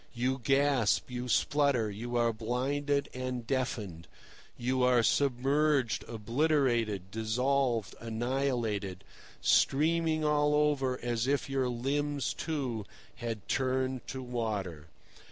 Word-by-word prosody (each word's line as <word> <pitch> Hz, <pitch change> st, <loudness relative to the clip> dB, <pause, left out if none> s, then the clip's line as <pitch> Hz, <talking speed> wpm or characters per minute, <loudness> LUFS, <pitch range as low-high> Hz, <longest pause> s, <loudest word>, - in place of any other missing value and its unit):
You 130 Hz, +2 st, -1 dB
gasp, 135 Hz, -4 st, +2 dB
you 125 Hz, 0 st, -4 dB
splutter, 140 Hz, -5 st, +2 dB
you 120 Hz, +4 st, -5 dB
are 120 Hz, -1 st, +2 dB
blinded 140 Hz, +5 st, -1 dB
and 125 Hz, -2 st, -4 dB
deafened, 115 Hz, -10 st, -3 dB, 0.5 s
you 130 Hz, +1 st, 0 dB
are 125 Hz, -2 st, +4 dB
submerged, 135 Hz, -2 st, +2 dB
obliterated, 115 Hz, -, 0 dB
dissolved, 120 Hz, +1 st, 0 dB
annihilated, 115 Hz, -5 st, -2 dB, 0.4 s
streaming 155 Hz, +2 st, +3 dB
all 150 Hz, 0 st, +3 dB
over 140 Hz, -4 st, +1 dB
as 120 Hz, 0 st, -1 dB
if 140 Hz, 0 st, 0 dB
your 135 Hz, -2 st, +1 dB
limbs, 140 Hz, +3 st, -1 dB
too, 135 Hz, -9 st, -3 dB, 0.3 s
had 115 Hz, -4 st, -5 dB
turned 130 Hz, -1 st, -1 dB
to 130 Hz, -1 st, -5 dB
water. 105 Hz, -10 st, -3 dB
125 Hz, 105 wpm, -31 LUFS, 115-140 Hz, 0.5 s, are